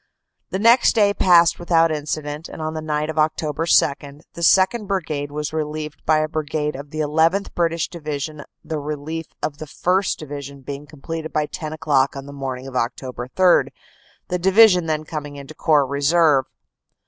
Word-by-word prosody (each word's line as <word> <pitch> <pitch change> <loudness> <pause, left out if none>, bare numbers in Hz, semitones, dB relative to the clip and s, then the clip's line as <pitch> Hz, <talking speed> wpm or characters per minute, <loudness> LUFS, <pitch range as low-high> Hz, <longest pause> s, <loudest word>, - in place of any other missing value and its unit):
The - - -2
next 230 +5 +5
day 205 -2 +4
passed 175 -4 +4
without 165 -1 +3
incident, 150 0 -4
and - - -9
on 155 0 -3
the 160 - -4
night 155 0 -2
of 160 - -12
Oct. 155 0 +2
2 150 -2 -3 0.8
the 170 - -9
2nd. 190 +6 +3
Brigade 155 -7 -2
was 150 +1 -4
relieved 155 -1 -4
by 155 0 +4
a 155 0 +1
Brigade 150 -1 -2
of 140 +2 -8
the 155 +1 -3
llth. 160 +6 +1
British 165 -1 0
Division 150 -2 -5 0.2
the 155 -1 -3
relief 150 +2 -5 0.2
of 145 -1 -3
the 155 - -7
1st. 185 +6 0
Division 140 -2 -8
being 140 +2 -7
completed 160 +2 -6
by 155 -1 0
ten 155 +1 -6
o - - -7
clock 140 -4 +1
on 135 0 -7
the 140 - -10
morning 130 -2 -5
of 135 - -9
Oct. 125 +1 -3 0.2
3, 185 -1 +5 0.6
the 180 -1 -1
Division 190 -1 +5
then 155 -1 -1
coming 150 -2 -6
into 140 +2 -10
Corps 150 -2 +3
Reserve." 140 0 +3
155 Hz, 180 wpm, -21 LUFS, 145-165 Hz, 0.8 s, next